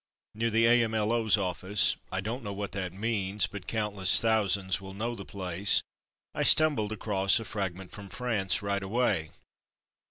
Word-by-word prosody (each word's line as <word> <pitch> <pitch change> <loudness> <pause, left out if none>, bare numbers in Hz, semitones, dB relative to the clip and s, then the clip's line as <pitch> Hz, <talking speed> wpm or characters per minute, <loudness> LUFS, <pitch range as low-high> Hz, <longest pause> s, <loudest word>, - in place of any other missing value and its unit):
Near 115 +2 -1
the 115 +1 +2
A.M.L.O.'s 115 -2 +2
office 95 +1 +1 0.2
(I 95 +1 -1
don't 115 +6 -4
know 100 -2 -5
what 100 0 -5
that 95 -3 -4
means, 100 -1 0
but 100 -2 -9
countless 105 -4 +3
thousands 100 -4 0
will 95 0 -10
know 115 +4 -3
the 100 - -8
place), 95 0 0 0.5
I - - -3
stumbled 145 -10 +4
across 100 -2 +1
a 115 - -7
"Fragment 95 -2 -5
from 100 -1 -10
France'' 100 -6 -1
right 100 0 -1
away. 95 -6 -1
100 Hz, 155 wpm, -28 LUFS, 95-110 Hz, 0.5 s, stumbled